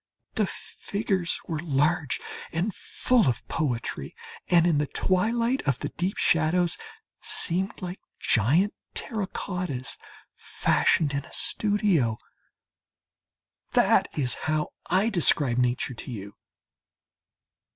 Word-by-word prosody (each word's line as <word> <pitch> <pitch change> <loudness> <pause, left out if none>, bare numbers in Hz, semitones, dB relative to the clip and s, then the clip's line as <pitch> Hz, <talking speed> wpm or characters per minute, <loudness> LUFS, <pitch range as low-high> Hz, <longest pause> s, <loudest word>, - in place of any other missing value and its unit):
The - - +1
figures 195 -4 -2
were 160 -2 -2
large 150 -1 +1 0.3
and 180 +6 -1
full 245 - +1
of 120 -3 -1
poetry 130 -7 -2 0.3
and, 170 -2 +5
in 165 -4 +3
the 150 - 0
twilight 230 - +1
of 135 -3 +2
the - - -4
deep 180 +3 -2
shadows, 165 +2 +3 0.5
seemed 185 +3 0
like 180 +1 -5 0.2
gigantic 150 - +3 0.2
terracottas 180 - -3 0.4
fashioned 145 -3 +2
in 140 0 -1
a - - -16
studio. 195 - +1 1.6
That - - +4
is 130 -4 0 0.2
how 155 0 0 0.2
I 190 +5 +3
describe 145 - +4
Nature 125 +1 +1
to 120 - -8
you. 100 -3 -7
170 Hz, 110 wpm, -27 LUFS, 140-190 Hz, 1.6 s, and